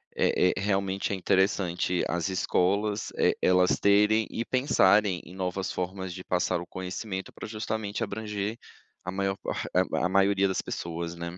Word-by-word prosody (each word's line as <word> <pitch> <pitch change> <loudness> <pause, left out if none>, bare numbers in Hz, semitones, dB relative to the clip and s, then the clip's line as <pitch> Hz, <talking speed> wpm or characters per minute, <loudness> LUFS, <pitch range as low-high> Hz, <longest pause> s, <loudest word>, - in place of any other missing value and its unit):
é 90 - +3
é - - -3
realmente, 95 -1 0
é - - +1
interessante 95 -2 +1
as 85 +2 -1
escolas 100 +3 0
e - - +3
elas 90 0 +3
terem 105 +2 +4
e 115 - -3
pensarem 105 -8 +3
em 90 - -12
novas 95 +1 -2
formas 95 0 -4
de 90 0 -8
passar 90 -1 0
o - - -7
conhecimento, 95 +1 -5
para - - -8
justamente 110 0 -3
abranger 105 0 -3 0.5
a 95 - -4
maior 95 0 -1
par - - -4 0.4
a 90 - +2
maioria 100 +1 +3
das 95 - -1
pessoas, 85 0 -5
né. 85 +1 -6
95 Hz, 160 wpm, -28 LUFS, 90-105 Hz, 0.5 s, terem